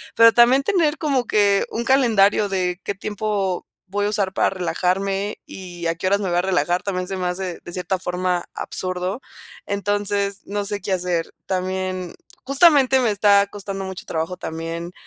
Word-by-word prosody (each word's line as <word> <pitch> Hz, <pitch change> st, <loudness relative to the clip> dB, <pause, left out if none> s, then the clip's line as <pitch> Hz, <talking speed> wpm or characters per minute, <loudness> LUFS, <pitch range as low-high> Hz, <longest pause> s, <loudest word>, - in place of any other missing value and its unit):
pero 230 Hz, 0 st, +7 dB
también 250 Hz, +3 st, +5 dB
tener 325 Hz, -5 st, +2 dB
como 275 Hz, -5 st, +1 dB
que, 200 Hz, -2 st, +3 dB
un 235 Hz, +1 st, -3 dB
calendario 215 Hz, -6 st, +4 dB
de 180 Hz, -1 st, -1 dB
qué 200 Hz, -, -3 dB
tiempo, 200 Hz, -2 st, -2 dB, 0.3 s
voy 205 Hz, +1 st, -1 dB
a -, -, +1 dB
usar 200 Hz, -3 st, -1 dB
para -, -, +2 dB
relajarme 195 Hz, +2 st, -1 dB
y 175 Hz, -2 st, -8 dB
a 165 Hz, -, 0 dB
qué 185 Hz, -, -2 dB
horas 200 Hz, +1 st, +3 dB
me 195 Hz, -, -2 dB
voy 175 Hz, -, +1 dB
a -, -, +4 dB
relajar, 180 Hz, -1 st, 0 dB
también 185 Hz, -2 st, -2 dB
se 195 Hz, -, -3 dB
me 180 Hz, -1 st, -3 dB
hace 180 Hz, 0 st, -3 dB
de 175 Hz, -, -9 dB
cierta 185 Hz, +1 st, -2 dB
forma 180 Hz, -1 st, -1 dB
absurdo. 185 Hz, +5 st, -3 dB, 0.4 s
Entonces, 200 Hz, 0 st, -1 dB
no 205 Hz, 0 st, -3 dB
sé 205 Hz, -1 st, -3 dB
qué 195 Hz, +1 st, -4 dB
hacer. 175 Hz, -2 st, -1 dB
También, 185 Hz, -1 st, -2 dB, 0.3 s
justamente 275 Hz, -1 st, +5 dB
me 235 Hz, -4 st, +2 dB
está 200 Hz, -1 st, +4 dB
costando 195 Hz, -1 st, -6 dB
mucho 190 Hz, -1 st, -7 dB
trabajo 165 Hz, +3 st, -3 dB
también 165 Hz, +1 st, -5 dB
195 Hz, 175 wpm, -22 LUFS, 180-205 Hz, 0.4 s, pero